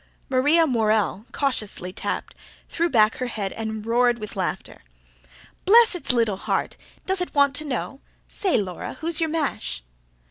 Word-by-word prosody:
Maria 290 +6 +4
Morell, 220 - +1
cautiously 215 -9 -2
tapped, - - -4 0.3
threw 340 +1 0
back 220 -5 +4
her 255 - -2
head 205 -5 -4
and 220 -1 -5
roared 240 +1 +3
with 215 -2 -7
laughter. 185 -2 -4 0.8
"Bless 455 +3 +6
its 355 - +1
little 230 -5 +1
heart! - - -2 0.3
Does 380 -1 -1
it 360 - -4
want 280 -1 +4
to 310 - -2
know? 275 0 -4 0.3
say, 380 -3 0
Laura, 190 -5 -4
who's 330 +1 0
your 325 - +1
mash?" 300 - -2
250 Hz, 150 wpm, -24 LUFS, 215-315 Hz, 0.8 s, Bless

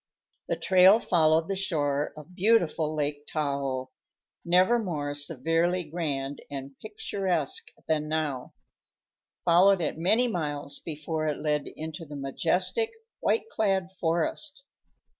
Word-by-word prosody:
The - - 0
trail 190 +3 +6
followed 160 -4 +3
the 195 - -1
shore 150 -6 0
of 150 +4 -12
beautiful 175 -6 +2
Lake 145 -1 -2
Tahoe 140 -4 -2 0.5
never 185 +7 +4
more 150 -9 -3
severely 165 +5 +1
grand 145 -4 -3
and 135 -1 -6
picturesque 190 -7 -2 0.2
than 155 -1 0
now 150 -5 -2 0.9
followed 185 +3 +5
it 160 -1 -2
many 220 +9 +3
miles 145 -8 -3
before 155 0 -3
it 150 - -1
led 150 -1 -1
into 160 +1 -7
the 145 - -8
majestic, 175 - 0 0.3
white 450 - +1
clad 195 -4 0
forest. 175 - -1
160 Hz, 120 wpm, -27 LUFS, 145-185 Hz, 0.9 s, trail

